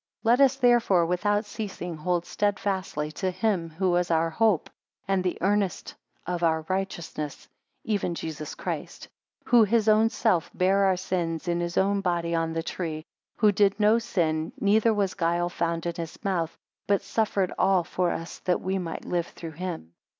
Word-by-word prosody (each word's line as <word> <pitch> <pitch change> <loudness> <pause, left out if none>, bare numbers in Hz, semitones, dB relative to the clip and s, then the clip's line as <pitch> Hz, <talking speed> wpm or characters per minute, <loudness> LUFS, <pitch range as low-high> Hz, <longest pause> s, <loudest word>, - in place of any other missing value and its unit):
5 - - -26
Let 240 +4 +5
us 270 -1 +5
therefore 240 -9 +4
without 205 +5 +1
ceasing 195 -5 -5
hold 175 +2 -1
steadfastly 190 -7 -1
to 185 +4 -2
him 185 -3 -1
who 175 +2 0
is 180 0 0
our 165 0 +2
hope, 215 -1 +2 0.4
and 195 -1 +1
the 180 - -1
earnest 200 0 0 0.3
of 175 -1 -3
our 160 -1 +2
righteousness, 170 -6 -4 0.4
even 200 -5 -1
Jesus 155 -2 -6
Christ; - - -5 0.4
Who, 240 -2 +6
his 220 +1 +2
own 215 +1 +5
self, 220 -7 +1
bare 195 +2 +3
our 190 -1 +3
sins 175 -3 -2
in 170 0 0
his 170 0 -3
own 200 +1 +2
body 170 -2 -1
on 165 -1 0
the 165 0 -2
tree: 160 -3 -4 0.3
who 215 -2 +5
did 200 0 +2
no 215 +2 +5
sin, 160 -8 -1
neither 215 +3 +4
was 200 -3 0
guile 175 -1 0
found 170 -1 -2
in 170 - -1
his 165 +2 -7
mouth; 175 -5 -1 0.3
but 200 -1 +2
suffered 200 -4 0
all 190 -2 +4
for 180 +1 -1
us 165 +1 -5
that 180 - 0
we 190 +1 -2
might 170 -3 -5
live 175 -1 -1
through 165 -1 -9
him. 165 - -6
180 Hz, 175 wpm, -26 LUFS, 170-205 Hz, 0.4 s, Who